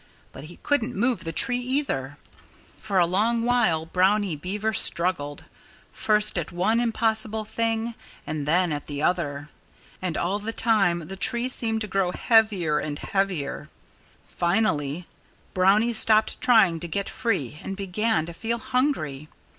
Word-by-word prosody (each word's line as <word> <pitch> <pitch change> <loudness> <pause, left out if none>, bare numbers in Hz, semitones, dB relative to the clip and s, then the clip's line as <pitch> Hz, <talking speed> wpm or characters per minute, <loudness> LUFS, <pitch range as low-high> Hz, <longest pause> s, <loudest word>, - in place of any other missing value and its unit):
But 135 - -10
he 175 +3 -12
couldn't 255 -4 0
move 235 -1 0
the 165 - -3
tree 245 +9 +2
either. 245 - -2 0.6
For 205 -3 -2
a 175 - +5
long 220 +6 +1
while 220 -10 +2
Brownie 190 +1 +1
Beaver 205 +8 -3
struggled, 170 -6 +1 0.5
first 210 -3 +1
at 160 - -5
one 185 +7 +1
impossible 220 -2 0
thing, 225 +1 -1 0.3
and 150 -1 -4
then 175 +2 +2
at 145 - -6
the 145 0 -4
other. 150 -5 -1 0.5
And 180 -3 -2
all 190 +4 -1
the 220 +2 -5
time 195 -9 +1
the 195 - -6
tree 235 +5 +1
seemed 225 -3 0
to 215 - -2
grow 190 -2 0
heavier 205 -10 +2
and 145 -1 -4
heavier. 195 -7 -2 0.6
Finally, 175 -4 -1 0.5
Brownie 200 +6 +3
stopped 220 -1 +3
trying 220 -10 +4
to 170 - -5
get 200 +4 -3
free 155 - -2
and 195 - -6
began 200 -1 0
to 170 - -8
feel 230 +7 -2
hungry. 225 - -2
195 Hz, 145 wpm, -25 LUFS, 165-225 Hz, 0.6 s, a